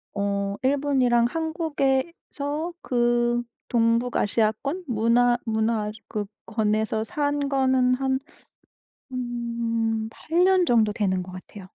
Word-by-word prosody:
어 200 0 -1
일본이랑 260 -4 +3
한국에서 315 0 -2
그 240 -1 +1 0.2
동북아시아권 230 - +1
문화 240 +1 +3
문화권에서 220 0 -1
산 285 +3 -1
거는 260 -2 +3
한 265 0 0 1.9
8 335 +9 0
년 375 -2 +4
정도 220 -3 +3
되는 190 -4 0
것 185 - -10
같아요. 185 +2 -10
240 Hz, 185 characters per minute, -25 LUFS, 220-280 Hz, 1.9 s, 년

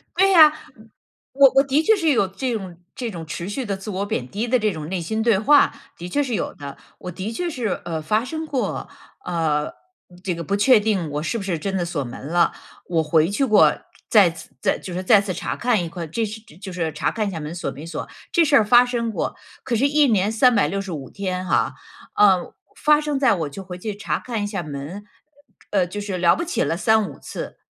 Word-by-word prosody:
对 390 +1 +4
呀。 310 -4 +8 0.8
我 275 0 +7
我 - - 0
我 270 - +6
的 280 +3 +1
确 440 +4 +5
是 330 -5 +1
有 200 -7 +2
这 245 +5 -3
种 190 -6 -6 0.2
这 240 -3 -4
种 165 -3 -7
持 170 +5 -5
续 260 +5 -3
的 200 -2 -2
自 195 +3 -8
我 200 0 -2
贬 125 -10 -3
低 220 +4 -3
的 255 +2 +3
这 215 -2 0
种 155 -3 -6
内 185 0 -3
心 220 +7 -2
对 225 -4 +3
话， 285 +8 +4 0.2
的 175 - -7
确 290 +10 0
是 250 -3 -4
有 - - -2
的。 140 -1 -9 0.2
我 180 - -7
的 190 +5 -5
确 350 +6 -2
是， 240 - -3
呃， 165 -2 -4
发 210 +9 +1
生 315 +5 -5
过， 270 -5 -3 0.4
呃， 160 -4 0
嗯 - - -8 0.5
这 180 - -1
个 170 0 -5
不 200 - 0
确 220 +3 +5
定 200 -7 -1
我 150 +1 -2
是 230 - -2
不 200 - -5
是 175 -5 -2
真 195 +3 -3
的 180 - 0
锁 170 -4 -3
门 120 - -8
了， 170 +2 +2 0.3
我 165 -2 +1
回 155 +1 +3
去 240 +8 0
过 215 -6 +5 0.4
再 195 -6 +6
次 165 -1 -12
再 - - +1
就 180 - -8
是 185 +1 -3
再 205 +1 +6
次 200 -2 -3
查 - - -4
看 235 -7 +1
一 - - -6
块 170 -1 -6
这 225 +8 -2
是 215 +1 -7
这 185 -9 -19
就 190 +1 -9
是 165 -3 -3
查 - - -1
看 215 -2 -2
一 195 - -3
下 165 -3 -5
门 150 +3 -6
锁 175 - -4
没 145 +4 -9
锁。 165 - -6 0.2
这 335 -1 +4
事 285 - +3
儿 225 - +6
发 240 +3 +6
生 235 -2 -2
过。 - - -3 0.3
可 245 - 0
是 265 +5 +3
1 295 -1 +4
年 210 -2 +2
365 195 - +1
天 185 -2 -4
哈， - - +1 0.4
呃 190 -4 +4 0.2
发 300 0 +4
生 295 -2 -2
在 260 -6 +4
我 160 -6 -2
就 195 - -8
回 180 -1 -8
去 210 +3 -4
查 - - -2
看 230 -4 -4
一 205 - -1
下 195 -4 -4
门， 150 +7 -7 0.7
呃 190 -3 +2
就 205 +4 -6
是 200 -3 -4
了 175 -1 +4
不 340 - -3
起 350 - -2
了 165 - -1
3-5 220 +1 +1
次。 - - -7
200 Hz, 250 characters per minute, -22 LUFS, 175-240 Hz, 0.8 s, 呀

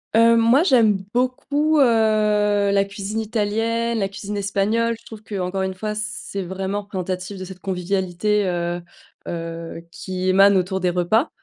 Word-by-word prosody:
Heu, 230 0 +6
moi, 235 +7 +5
j'aime 220 - +3
beaucoup, 285 +5 +1
heu, - - +7 0.9
la 200 0 +3
cuisine 200 +2 -4
italienne, 225 +2 -1
la 195 - +1
cuisine 200 +1 -6
espagnole. 210 +4 0
Je 230 - -25
trouve 220 -2 -10
qu'encore 190 -3 -3
une 190 0 -2
fois, 210 +3 -4
c'est 215 -2 -4
vraiment 190 +3 -3
représentatif 185 0 -4
de 185 - -6
cette 185 0 -10
convivialité, 190 +2 -1
heu 175 0 -2 0.5
heu, 165 0 -5
qui 185 0 -3
émane 195 +1 +6
autour 190 +1 0
des 180 - +1
repas. 180 - +1
200 Hz, 150 wpm, -22 LUFS, 185-225 Hz, 0.9 s, heu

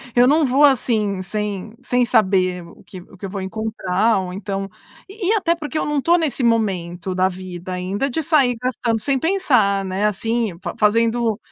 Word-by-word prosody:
Eu 245 0 +6
não 300 +4 +4
vou 270 +3 +3
assim 220 -8 +2
sem 210 +1 -4
sem 245 0 +1
saber 185 -5 +2
o 170 - -16
que 185 -3 -10
o 185 - -17
que 195 - -7
eu - - -5
vou 195 0 -5
encontrar 215 +1 0
ou 185 -1 -5
então 195 0 -4 0.4
e 395 -2 -5
e 420 - +3
até 355 -6 +1
porque 315 -1 -5
eu - - 0
não 295 -1 -1
estou 340 +5 +3
nesse 310 -5 -1
momento 190 -6 0
da 185 +1 +2
vida 185 -1 -7
ainda 195 +9 -2
de 315 +5 -2
sair 280 -6 +3
gastando 240 -3 -1
sem 270 +3 +1
pensar, 250 - +2
né? 190 +2 -2
Assim 220 -1 -1
fa - - -4
fazendo 225 +1 +2
220 Hz, 195 wpm, -20 LUFS, 190-255 Hz, 0.4 s, Eu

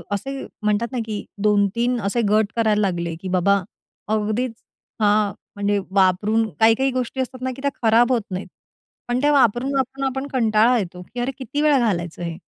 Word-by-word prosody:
असे 270 +7 -5 0.2
म्हणतात 210 +3 0
ना, 255 - -3
की 215 -2 -5 0.2
2,, 205 -1 +4
3 240 +1 +1
असे 200 +4 0
गट 215 0 +2
करायला 215 -2 +2
लागले 170 -4 -1
की 190 - -6
बाबा, 190 +2 +3 0.5
अगदीच, 220 +3 -1 0.5
हां, 210 -1 +3 0.2
म्हणजे 205 0 0
वापरून 200 +4 +2
काही-काही 225 +5 +4
गोष्टी 255 +1 -2
असतात 255 0 -6
ना, 260 - -1
की 270 - -10
त्या 280 0 0
खराब 235 +2 +4
होत 245 -2 +2
नाहीत. 185 +2 -4 0.6
पण 245 +1 0
त्या 295 +1 +3
वापरून-वापरून 265 +1 +1
आपण 265 +1 -3
कंटाळा 230 0 +3
येतो, 180 -4 -4
की 245 - -5
अरे 245 +3 -1
किती 265 +2 -3
वेळा 300 -3 +4
घालायचं 175 -8 -1
हे? 170 -1 -4
225 Hz, 175 wpm, -22 LUFS, 205-255 Hz, 0.6 s, 2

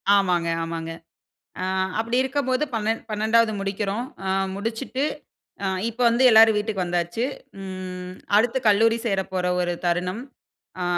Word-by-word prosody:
ஆமாங்க, 180 -4 +2 0.2
ஆமாங்க. 165 0 -4 0.7
ஆ - - -1 0.4
அப்படி 230 +2 0
இருக்கும்போது, 265 0 0
பன்னெண்ட் 225 0 0
பன்னெண்டாவது 220 +1 +3
முடிக்கிறோம். 200 +4 -2 0.2
அ 190 - -1 0.3
முடிச்சுட்டு, 225 +6 -3 0.6
அ - - +1 0.2
இப்ப 240 +2 -6
வந்து, 240 +3 +2
எல்லாரும் 220 -1 +7
வீட்டுக்கு 210 -3 -1
வந்தாச்சு. 175 +6 -1 0.4
ம் 185 -1 -6 0.2
அடுத்து 245 +4 +2
கல்லூரி 225 +2 +4
சேரப்போற 190 -3 -1 0.2
ஒரு 175 0 0
தருணம். 180 +5 0 0.6
அ - - 0
210 Hz, 125 wpm, -24 LUFS, 185-230 Hz, 0.7 s, எல்லாரும்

